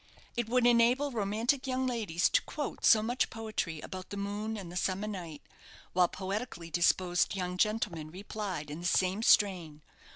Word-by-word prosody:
It 240 Hz, -2 st, -2 dB
would 250 Hz, 0 st, +3 dB
enable 245 Hz, +4 st, +4 dB
romantic 230 Hz, +5 st, 0 dB
young 260 Hz, 0 st, 0 dB
ladies 215 Hz, -9 st, +1 dB
to -, -, +3 dB
quote 295 Hz, -2 st, -5 dB
so 215 Hz, -2 st, +6 dB
much 245 Hz, +3 st, 0 dB
poetry 215 Hz, -8 st, -4 dB
about 185 Hz, -1 st, -8 dB
the 200 Hz, -, -6 dB
moon 205 Hz, +2 st, -3 dB
and 185 Hz, -4 st, -7 dB
the -, -, -9 dB
summer 185 Hz, +3 st, -1 dB
night, 175 Hz, -8 st, -6 dB, 0.5 s
while 180 Hz, -1 st, +4 dB
poetically 190 Hz, -2 st, -5 dB
disposed 175 Hz, +2 st, +2 dB
young 180 Hz, -1 st, -3 dB
gentlemen 190 Hz, -6 st, 0 dB
replied 185 Hz, -4 st, -5 dB
in 150 Hz, -, -6 dB
the 175 Hz, -, -1 dB
same 185 Hz, +3 st, +2 dB
strain. 175 Hz, -9 st, +3 dB
200 Hz, 165 wpm, -31 LUFS, 175-225 Hz, 0.5 s, so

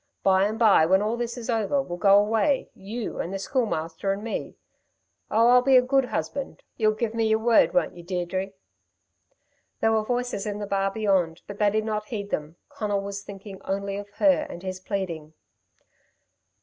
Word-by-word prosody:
By 190 Hz, 0 st, +4 dB
and 215 Hz, +2 st, -2 dB
by 210 Hz, -8 st, +5 dB
when 190 Hz, +3 st, +4 dB, 0.2 s
this 235 Hz, 0 st, -3 dB
is 235 Hz, -, -6 dB
all 230 Hz, -3 st, +1 dB
over, 280 Hz, +7 st, 0 dB
we'll 175 Hz, -10 st, -4 dB
go 200 Hz, +1 st, +6 dB
away 225 Hz, +7 st, +1 dB
you 215 Hz, +4 st, -6 dB
and 175 Hz, -, -3 dB
the 195 Hz, -, -2 dB
Schoolmaster 195 Hz, -, -2 dB
and 200 Hz, +2 st, -3 dB
me. 230 Hz, -, -4 dB, 0.7 s
Oh, 230 Hz, +2 st, +4 dB
I'll 250 Hz, 0 st, +7 dB
be 265 Hz, 0 st, +5 dB
a 250 Hz, -, +5 dB
good 270 Hz, +1 st, +2 dB
husband. 275 Hz, +2 st, -4 dB
You'll 215 Hz, -2 st, +2 dB
give 220 Hz, 0 st, -2 dB
me 225 Hz, -1 st, +1 dB
y'r 220 Hz, 0 st, +3 dB
word, 230 Hz, 0 st, +4 dB
won't 270 Hz, -, +1 dB
you, 175 Hz, -, -10 dB
Deirdre?" 185 Hz, +2 st, -3 dB, 1.3 s
There 225 Hz, -, +2 dB
were 220 Hz, -1 st, +3 dB
voices 245 Hz, -3 st, -2 dB
in 205 Hz, -1 st, -3 dB
the 210 Hz, -, -4 dB
bar 195 Hz, -1 st, 0 dB
beyond, 195 Hz, -5 st, 0 dB
but 205 Hz, 0 st, -9 dB
they 210 Hz, -1 st, +4 dB
did 215 Hz, +1 st, -1 dB
not 215 Hz, -1 st, -2 dB
heed 205 Hz, -4 st, -5 dB
them. 150 Hz, +2 st, -3 dB
Conal 205 Hz, -2 st, -2 dB
was 200 Hz, 0 st, -5 dB
thinking 200 Hz, -1 st, -10 dB
only 195 Hz, 0 st, -3 dB
of 205 Hz, 0 st, -7 dB
her 290 Hz, -2 st, +3 dB
and 175 Hz, -, -9 dB
his 185 Hz, -1 st, -4 dB
pleading. 170 Hz, -6 st, -4 dB
205 Hz, 190 wpm, -25 LUFS, 195-230 Hz, 1.3 s, I'll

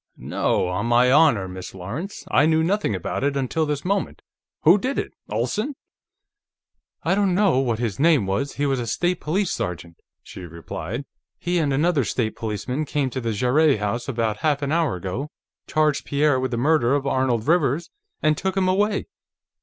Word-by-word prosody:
"No; -, -, 0 dB
on 95 Hz, +5 st, -2 dB
my 120 Hz, +1 st, +4 dB
honor, 135 Hz, -10 st, +4 dB
Miss 90 Hz, +1 st, -8 dB
Lawrence. 125 Hz, -, -6 dB
I 145 Hz, -, +4 dB
knew 160 Hz, 0 st, +3 dB
nothing 195 Hz, -, 0 dB
about 95 Hz, -, -3 dB
it 140 Hz, 0 st, +1 dB
until 145 Hz, +4 st, 0 dB
this 145 Hz, 0 st, -3 dB
moment. 200 Hz, +1 st, -2 dB, 0.4 s
Who 175 Hz, +6 st, +6 dB
did 260 Hz, +6 st, -2 dB
it? -, -, -3 dB, 0.2 s
Olsen?" 130 Hz, -, -2 dB, 1.3 s
"I -, -, +2 dB
don't 195 Hz, -2 st, +2 dB
know 195 Hz, -9 st, +3 dB
what 120 Hz, -4 st, 0 dB
his 115 Hz, -3 st, -3 dB
name 155 Hz, -7 st, +4 dB
was. 100 Hz, +9 st, -1 dB
He 145 Hz, -, -1 dB
was 135 Hz, -2 st, +1 dB
a 120 Hz, -, -3 dB
State 175 Hz, +7 st, 0 dB
Police 185 Hz, +5 st, 0 dB
sergeant," 85 Hz, -1 st, -4 dB, 0.3 s
she -, -, -10 dB
replied. 85 Hz, -, -6 dB, 0.3 s
"He 175 Hz, 0 st, -1 dB
and 150 Hz, -3 st, +1 dB
another 150 Hz, +1 st, +2 dB
State 110 Hz, -1 st, -1 dB
Policeman 115 Hz, +6 st, -3 dB
came 140 Hz, -2 st, -1 dB
to 130 Hz, -, -3 dB
the 115 Hz, -1 st, -1 dB
Jarrett 130 Hz, +6 st, +3 dB
house 105 Hz, +5 st, -2 dB
about 115 Hz, -5 st, -1 dB
half 145 Hz, +1 st, 0 dB
an 140 Hz, -, -1 dB
hour 165 Hz, -, +1 dB
ago, 95 Hz, -, -4 dB, 0.4 s
charged 155 Hz, -2 st, +1 dB
Pierre 145 Hz, -1 st, +2 dB
with 130 Hz, 0 st, -1 dB
the 120 Hz, -, -2 dB
murder 140 Hz, -1 st, +3 dB
of 140 Hz, -1 st, -1 dB
Arnold 130 Hz, -4 st, 0 dB
Rivers, 160 Hz, -1 st, +1 dB, 0.3 s
and 155 Hz, 0 st, +4 dB
took 190 Hz, +4 st, -2 dB
him 185 Hz, -1 st, +2 dB
away. 205 Hz, +2 st, +1 dB
140 Hz, 185 wpm, -23 LUFS, 115-160 Hz, 1.3 s, Who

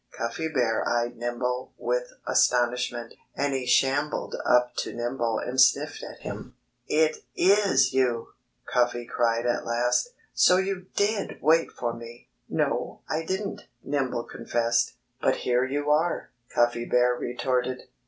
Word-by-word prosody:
Cuffy 115 Hz, +8 st, -2 dB
Bear 125 Hz, -7 st, +1 dB
eyed 120 Hz, 0 st, 0 dB
Nimble 125 Hz, +2 st, -3 dB
with -, -, -1 dB
astonishment. 120 Hz, -1 st, +1 dB, 0.2 s
And 140 Hz, 0 st, 0 dB
he 130 Hz, -2 st, -2 dB
shambled 140 Hz, +4 st, +1 dB
up 125 Hz, 0 st, +3 dB
to -, -, -3 dB
Nimble 120 Hz, -1 st, -1 dB
and 130 Hz, +1 st, +1 dB
sniffed 130 Hz, 0 st, +3 dB
at -, -, -9 dB
him. -, -, -7 dB, 0.3 s
"It 155 Hz, 0 st, +2 dB, 0.2 s
is 190 Hz, -9 st, +4 dB
you!" 125 Hz, -3 st, +1 dB, 0.4 s
Cuffy 120 Hz, -1 st, +1 dB
cried 115 Hz, 0 st, 0 dB
at 120 Hz, -, 0 dB
last. 120 Hz, -, +1 dB, 0.2 s
"So 180 Hz, -, +5 dB
you 190 Hz, -1 st, -2 dB
did 205 Hz, +1 st, 0 dB
wait 160 Hz, +3 st, +3 dB
for 120 Hz, -1 st, -3 dB
me!" 115 Hz, -, -11 dB, 0.2 s
"No, -, -, -1 dB
I 160 Hz, +1 st, -1 dB
didn't," 195 Hz, +3 st, -4 dB, 0.2 s
Nimble 130 Hz, -4 st, -1 dB
confessed. 115 Hz, 0 st, 0 dB, 0.3 s
"But -, -, +3 dB
here 125 Hz, +1 st, +1 dB
you 145 Hz, +2 st, -1 dB
are!" 160 Hz, +3 st, +1 dB, 0.2 s
Cuffy 120 Hz, 0 st, +1 dB
Bear 125 Hz, 0 st, +3 dB
retorted. 125 Hz, +1 st, -2 dB
125 Hz, 135 wpm, -26 LUFS, 120-150 Hz, 0.4 s, So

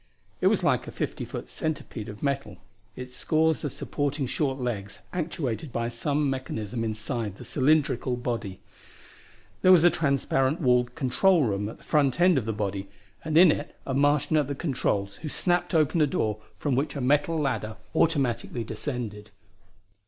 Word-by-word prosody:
It -, -, +4 dB
was -, -, +2 dB
like -, -, +2 dB
a -, -, -6 dB
fifty -, -, -3 dB
foot -, -, -6 dB
centipede 145 Hz, -8 st, -4 dB
of 105 Hz, 0 st, -9 dB
metal, 140 Hz, -9 st, -2 dB, 0.4 s
its 125 Hz, 0 st, -8 dB
scores 160 Hz, +3 st, +1 dB
of 145 Hz, -, -2 dB
supporting 145 Hz, +1 st, -2 dB
short 135 Hz, +1 st, -1 dB
legs 105 Hz, -5 st, -3 dB, 0.2 s
actuated 155 Hz, -6 st, -3 dB
by 115 Hz, 0 st, -1 dB
some 140 Hz, +5 st, 0 dB
mechanism 120 Hz, -4 st, -3 dB
inside 110 Hz, -1 st, -3 dB
the -, -, -10 dB
cylindrical 145 Hz, -2 st, +2 dB
body. 115 Hz, -6 st, -4 dB, 1.0 s
There 185 Hz, -, +6 dB
was 175 Hz, -3 st, +7 dB
a 175 Hz, -, +7 dB
transparent 140 Hz, 0 st, +1 dB
walled 125 Hz, -4 st, +2 dB
control 160 Hz, +6 st, +3 dB
room 105 Hz, -3 st, -1 dB
at -, -, -10 dB
the -, -, -21 dB
front 145 Hz, -1 st, +2 dB
end 180 Hz, -4 st, +5 dB
of 115 Hz, -, -6 dB
that 110 Hz, -, -1 dB
body, 100 Hz, -2 st, -3 dB, 0.4 s
and 155 Hz, 0 st, +1 dB
in 175 Hz, -1 st, +8 dB
it 145 Hz, -, -4 dB
a 135 Hz, -, -2 dB
Martian 145 Hz, +2 st, +3 dB
at 145 Hz, -3 st, +2 dB
the 140 Hz, -, -3 dB
controls 105 Hz, -10 st, -1 dB
who 155 Hz, -, -6 dB
snapped 175 Hz, +3 st, 0 dB
open 155 Hz, +1 st, +3 dB
a 150 Hz, -, +5 dB
door 110 Hz, -5 st, -1 dB, 0.2 s
from 145 Hz, -4 st, 0 dB
which 140 Hz, +3 st, -1 dB
a -, -, -3 dB
metal 145 Hz, +5 st, +2 dB
ladder 120 Hz, -7 st, -2 dB, 0.2 s
automatically 130 Hz, -6 st, +1 dB
descended. 110 Hz, -3 st, -5 dB
135 Hz, 170 wpm, -27 LUFS, 115-150 Hz, 1.0 s, in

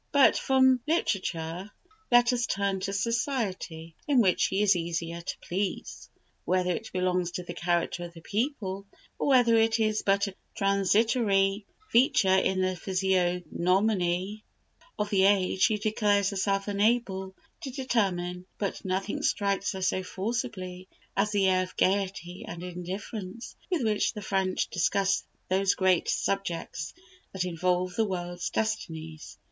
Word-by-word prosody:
But 280 Hz, -2 st, +6 dB
from 260 Hz, -1 st, +4 dB
literature 185 Hz, -, -1 dB, 0.4 s
let 240 Hz, +1 st, +6 dB
us 240 Hz, -2 st, 0 dB
turn 200 Hz, -1 st, 0 dB
to 195 Hz, +1 st, -3 dB
society, 200 Hz, -, -2 dB
in 280 Hz, -4 st, +4 dB
which 190 Hz, -6 st, +3 dB
she 195 Hz, +2 st, +2 dB
is 205 Hz, -2 st, +5 dB
easier 170 Hz, 0 st, -3 dB
to -, -, -5 dB
please. 190 Hz, +2 st, -3 dB, 0.3 s
Whether 180 Hz, 0 st, +1 dB
it 220 Hz, +5 st, -4 dB
belongs 180 Hz, -1 st, 0 dB
to 180 Hz, -, -4 dB
the -, -, -7 dB
character 175 Hz, 0 st, -1 dB
of 170 Hz, -, -10 dB
the 165 Hz, -, -11 dB
people, 200 Hz, -, -2 dB, 0.3 s
or -, -, 0 dB
whether 245 Hz, -4 st, +5 dB
it 225 Hz, 0 st, +3 dB
is 215 Hz, -1 st, +1 dB
but 200 Hz, 0 st, +2 dB
a 200 Hz, -, -5 dB, 0.2 s
transitory 200 Hz, 0 st, +2 dB, 0.2 s
feature 225 Hz, -6 st, +4 dB
in 190 Hz, 0 st, +2 dB
the 185 Hz, 0 st, 0 dB
physiognomy 185 Hz, +1 st, 0 dB, 0.5 s
of 210 Hz, 0 st, -2 dB
the 190 Hz, -2 st, +4 dB
age, 190 Hz, -2 st, +2 dB
she 215 Hz, 0 st, +4 dB
declares 205 Hz, -2 st, +1 dB
herself 195 Hz, 0 st, 0 dB
unable 200 Hz, -2 st, 0 dB, 0.3 s
to 285 Hz, -, -5 dB
determine; 190 Hz, -9 st, -1 dB
but 200 Hz, -2 st, -3 dB
nothing 190 Hz, +2 st, -2 dB
strikes 200 Hz, 0 st, 0 dB
her 190 Hz, -1 st, -4 dB
so 185 Hz, 0 st, +1 dB
forcibly 185 Hz, -2 st, -4 dB, 0.3 s
as 200 Hz, +2 st, +2 dB
the 200 Hz, -2 st, +2 dB
air 185 Hz, -1 st, +3 dB
of 185 Hz, -, -6 dB
gaiety 190 Hz, -2 st, 0 dB
and 170 Hz, +1 st, -7 dB
indifference 185 Hz, +4 st, -6 dB
with 355 Hz, -8 st, 0 dB
which 215 Hz, -2 st, +1 dB
the 210 Hz, -2 st, -7 dB
French 190 Hz, -1 st, 0 dB
discuss 195 Hz, +2 st, +1 dB, 0.2 s
those 190 Hz, +1 st, +2 dB
great 185 Hz, -2 st, +2 dB
subjects 170 Hz, -6 st, -2 dB, 0.4 s
that 185 Hz, -2 st, -1 dB
involve 180 Hz, +1 st, 0 dB
the 225 Hz, -, +1 dB
world's 175 Hz, -2 st, -3 dB
destinies. 160 Hz, -8 st, -4 dB
195 Hz, 140 wpm, -28 LUFS, 180-215 Hz, 0.5 s, But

